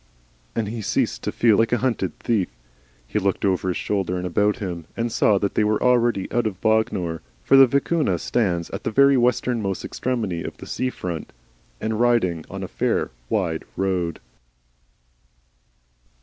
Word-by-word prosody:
and 110 -2 -1
he 115 0 -4
ceased 100 - 0
to - - -2
feel 115 -3 +4
like 115 - +2
a 120 - +3
hunted 115 - -1
thief. 105 -6 0 0.6
He 105 - -1
looked 100 0 0
over 95 -1 +1
his 90 - 0
shoulder 95 -3 -1
and 90 - -3
about 105 +4 +1
him, 85 -5 -5
and 115 0 -1
saw 105 -2 +3
that 100 0 -1
they - - +2
were 105 0 +1
already 120 -5 +2
out 120 -2 +1
of 95 -4 -5
Bognor 95 -7 0 0.2
for - - +4
the 135 -1 +9
Vicuna 140 - +1
stands 90 -4 -1
at 100 - -5
the - - -1
very 140 +4 +5
westernmost 120 -5 0
extremity 110 -9 -2
of - - -6
the - - -10
sea 130 - -2
front 85 -9 -5 0.5
and 110 0 -2
riding 115 -9 +2
on - - -6
a - - -4
fair - - -1 0.2
wide 85 -6 -1
road. 90 -4 -1
105 Hz, 170 wpm, -23 LUFS, 90-120 Hz, 0.6 s, the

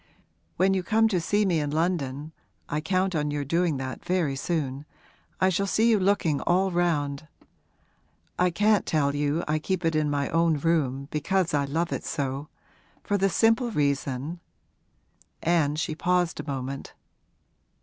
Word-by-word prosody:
When 190 +2 +3
you 190 - +1
come 220 +5 +3
to 185 -5 0
see 205 +5 +1
me 175 -4 +2
in 145 -1 -1
London 155 -2 -1 0.4
(I 150 - -2
count 185 +3 0
on 150 -2 0
your 145 -1 -2
doing 165 0 +1
that 130 -1 -6
very 175 -7 0
soon) 145 -2 -3 0.5
I 185 - +4
shall 195 +2 0
see 225 +4 +3
you 215 - +4
looking 185 -6 +1
all 190 +2 +2
round. 155 -4 0 1.1
I 180 0 +4
can't 205 +3 +2
tell 140 -3 +1
you 145 +3 0
I 155 +1 +1
keep 185 +2 -2
it 165 -1 +1
in 155 -1 +1
my 145 -1 0
own 165 -1 +2
room 140 -4 0
because 165 +4 0
I 145 -1 +2
love 165 +5 -1
it - - -4
so, 140 -1 -3 0.6
for 205 - -1
the 195 0 +2
simple 225 +5 +3
reason 140 - -1 0.5
' - - -29 0.2
And 150 -1 0
she 155 - -1
paused 175 +1 0
a 150 - -6
moment. 135 0 -5
160 Hz, 165 wpm, -26 LUFS, 145-185 Hz, 1.1 s, I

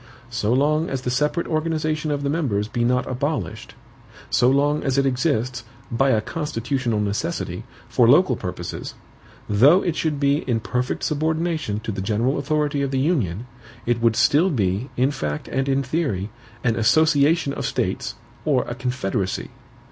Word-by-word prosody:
So 115 -2 0
long 150 +5 +2
as 135 -2 -3
the 125 - -1
separate 150 +6 0
organization 155 -1 -1
of 145 -1 -1
the 140 - 0
members 120 -11 0
be 120 +1 -1
not 125 +1 +2
abolished; 130 - -3 0.6
so 125 - +4
long 145 +2 +2
as 135 -1 0
it 140 - +3
exists, 125 -3 0 0.3
by 135 +4 +2
a 110 -4 +3
constitutional 130 -4 -2
necessity, 100 - -2 0.2
for - - +3
local - - +5
purposes; - - -6 0.5
though 135 - +5
it 170 -3 -1
should 155 -4 -1
be 140 0 +3
in 115 -2 +2
perfect 125 +3 -2
subordination 155 -6 -1
to 110 - -4
the 95 - -4
general 115 +8 0
authority 145 0 0
of 140 - 0
the 135 - -1
union, 125 - 0 0.4
it 120 -1 0
would 115 -1 +3
still 160 +11 +4
be, 105 - -1
in 130 +3 +3
fact 75 - -4
and 135 +1 -1
in 135 0 +2
theory, 130 - -2 0.3
an 115 -3 +1
association 145 +5 +3
of 140 - -4
states, 95 +1 -2 0.3
or 140 -5 +2
a - - -5
confederacy. 120 -6 -2
135 Hz, 165 wpm, -22 LUFS, 115-150 Hz, 0.6 s, local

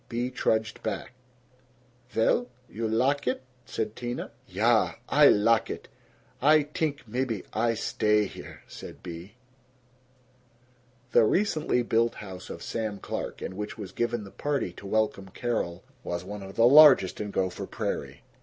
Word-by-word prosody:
Bea 120 +1 -2
trudged 110 -3 0
back. - - -4 1.0
"Vell? 120 +1 +2 0.2
You 115 0 -3
lak 130 +6 +1
it?" 130 +1 -1 0.2
said 110 - -3
Tina. 120 0 -5 0.2
"Ya. 110 +4 +2 0.2
Ay - - +7
lak 110 +2 +3
it. - - -6 0.5
Ay 150 +2 +6
t'ink 150 -2 -3
maybe 120 -2 -2
Ay 115 +1 +1
stay 105 -1 +2
here," - - -10
said - - -11
Bea. 85 -1 -7
IV 100 - -20 1.8
The 120 - +6
recently 155 - +1
built 115 0 +1
house 95 -3 -9
of - - -7
Sam 110 -3 -3
Clark, - - -5
in 95 - -5
which 105 +1 -5
was 100 -4 -7
given 120 +1 -1
the 100 - -11
party 140 -11 -2
to 100 - -10
welcome 105 -2 0
Carol, 100 -5 -3 0.2
was 85 0 -3
one 100 +2 -7
of 95 0 -9
the 115 - +5
largest 135 -9 +7
in 105 - -3
Gopher 95 -2 -2
Prairie. - - -4
110 Hz, 150 wpm, -27 LUFS, 100-125 Hz, 1.8 s, Ay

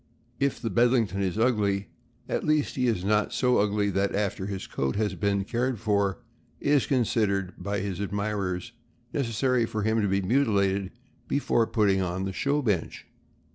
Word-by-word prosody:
If 140 -1 0
the 115 -3 -3
Bedlington 115 -3 +2
is 95 +1 -1
ugly, 105 -4 +1 0.4
at - - -1
least 155 -1 +1
he 125 -1 +1
is 95 -6 0
not 105 +1 +2
so 125 -1 +2
ugly 100 0 +1
that 100 +1 0
after 100 -2 -1
his 100 -2 -4
coat 65 0 -2
has 105 -1 0
been 100 +2 0
cared 120 +2 -1
for 100 -2 +1 0.4
it - - -2
is 145 -3 +3
considered, 105 -7 +1
by 100 -1 -3
his 100 -2 -4
admirers, 100 0 -2 0.4
necessary 125 -2 +1
for 110 -1 -3
him 110 +1 +2
to 100 - +1
be 100 0 +1
mutilated 100 -5 +2 0.4
before 120 -5 +1
putting 100 -4 +2
on 90 +1 -2
the 95 - -3
show 140 +7 0
bench. 100 -9 -1
105 Hz, 170 wpm, -27 LUFS, 100-120 Hz, 0.4 s, is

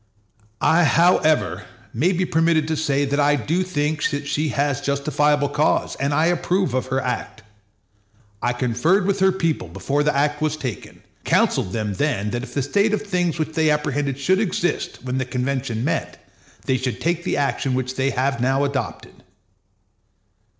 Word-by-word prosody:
I. 170 +2 +4
however, 165 -1 +3 0.3
may 160 +11 +2
be 185 0 0
permitted 160 -2 +2
to 160 - 0
say 145 -2 0
that 140 +1 -1
I 145 0 +4
do 155 - -1
think 150 -4 -1
that 145 0 -4
she 150 +2 0
has 140 -1 0
justifiable 145 +1 +1
cause, 150 - +1
and 140 +1 -1
I 155 +3 +2
approve 175 -2 +1
of 130 0 -1
her 130 +1 0
act. 125 -3 -4 1.0
I 120 - +1
conferred 125 - +1
with 200 0 0
her 190 0 +4
people 165 - -1
before 95 - -2
the 150 0 +1
act 150 +1 +1
was 155 0 0
taken, 125 - -7 0.2
counseled 90 - +1
them 105 -2 -2
then 105 -4 -1
that 120 - -2
if 130 - -9
the 140 - +1
state 205 +9 +2
of - - -5
things 180 -5 -1
which 155 -1 -2
they 160 -1 +2
apprehended 145 -2 0
should 185 +8 +2
exist 175 - -2
when 130 0 -2
the - - 0
convention 125 -2 -2
met, 165 +4 -2 0.5
they 130 - +1
should 130 -1 -3
take 175 +1 -1
the - - -1
action 140 -2 0
which 130 0 -2
they 135 +1 +1
have 130 -2 -1
now 135 +2 +2
adopted. 140 -1 -4
145 Hz, 175 wpm, -22 LUFS, 130-160 Hz, 1.0 s, I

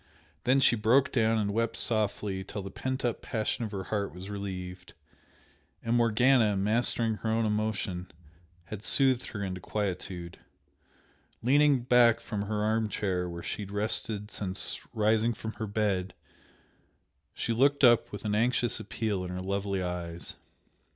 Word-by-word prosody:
Then 130 +2 +4
she 130 - +5
broke 115 +5 +3
down 115 -2 +2
and 100 -2 0
wept 115 +1 0
softly 105 -3 0
till 100 +1 -6
the 95 - -7
pent 130 +3 -3
up 120 - -1
passion 115 0 -2
of 105 - -6
her 95 -2 -4
heart 100 -6 -1
was 95 +3 -8
relieved, 90 -2 -6 0.9
and 115 +1 +1
Morgana, 115 -2 +4
mastering 110 +2 +2
her 110 - -3
own 110 0 +1
emotion, 105 -4 -2 0.6
had 105 +3 -7
soothed 130 -1 +2
her 100 -2 -5
into 95 -1 -4
quietude. 90 -4 -4 1.0
Leaning 140 +1 +4
back 120 -1 +5
from 105 -2 -4
her 105 0 -1
arm 110 0 +1
chair 90 -3 -1
where 85 0 -7
she - - -4
had 100 - -6
rested 105 0 -2
since 95 -2 -1
rising 110 +1 +2
from 110 +1 -6
her 110 - -5
bed, 100 -3 -1 1.2
she 115 - -1
looked 140 +4 +3
up 120 -2 +5
with 105 - -7
an 105 - 0
anxious 120 +1 +1
appeal 105 -2 -2
in 90 - -5
her 90 0 -4
lovely 100 0 -1
eyes. 85 -1 -4
105 Hz, 155 wpm, -29 LUFS, 95-115 Hz, 1.2 s, she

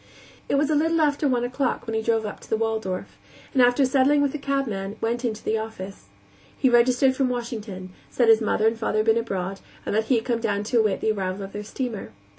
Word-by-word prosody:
It - - +2
was 290 +2 +2
a - - +3
little 325 +2 +2
after 295 -1 +2
one 250 -3 +1
o'clock 255 +2 -1
when 225 - -4
he 220 - 0
drove 225 -1 +1
up 210 - -6
to - - -16
the 220 - +1
Waldorf, 220 -5 -3 0.3
and 265 - +4
after 245 +3 +5
settling 275 +2 +3
with 280 - +1
the 300 - -5
cabman, 225 -9 -2
went 235 +2 -1
into 220 -3 -3
the 220 0 0
office. 200 -3 -7 0.5
He 260 - +3
registered 250 +2 +4
from 265 -1 +1
Washington; 215 -6 -5 0.2
said 240 - +1
his 225 0 +6
mother 215 0 +1
and 225 0 +2
father 220 -1 -1
had 215 - +2
been 225 0 +4
abroad, 195 -4 -3 0.3
and - - -2
that 220 +1 +1
he 255 - +2
had 225 - -1
come 235 -2 0
down 205 -3 0
to 230 +3 +1
await 215 -3 +1
the 220 - +2
arrival 195 -1 -3
of 195 - -8
their 210 - -5
steamer. 230 - -5
225 Hz, 235 wpm, -24 LUFS, 215-260 Hz, 0.5 s, his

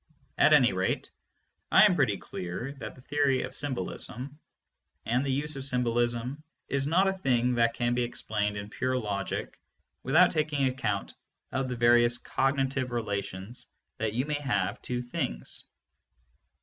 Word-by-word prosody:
At - - +6
any - - +6
rate - - -1 0.6
I - - +8
am 205 - +5
pretty 135 - +2
clear 90 +9 -5
that - - -7
the 130 - -15
theory 140 -2 +2
of - - -6
symbolism 135 - -4 0.7
and 125 +4 +1
the 140 - -1
use 150 +3 -1
of 135 - -5
symbolism 120 +1 0 0.3
is 140 0 0
not 185 +5 +4
a 190 - +2
thing 125 -9 +1
that 115 -1 +2
can 120 0 +1
be 125 - +1
explained 105 -3 -2
in 100 +1 -6
pure 130 +2 0
logic 100 -5 -3 0.4
without 160 +7 +5
taking 150 -3 +1
account 115 -6 -1 0.4
of 130 0 -1
the 125 - -3
various 120 0 +5
cogni 135 +1 0
tive 130 -2 -2
relations 100 -1 -4 0.3
that 110 -1 -1
you 125 +4 0
may 150 -1 -2
have 100 -8 -1
to 125 0 -3
things. - - -4
125 Hz, 155 wpm, -29 LUFS, 115-135 Hz, 0.7 s, I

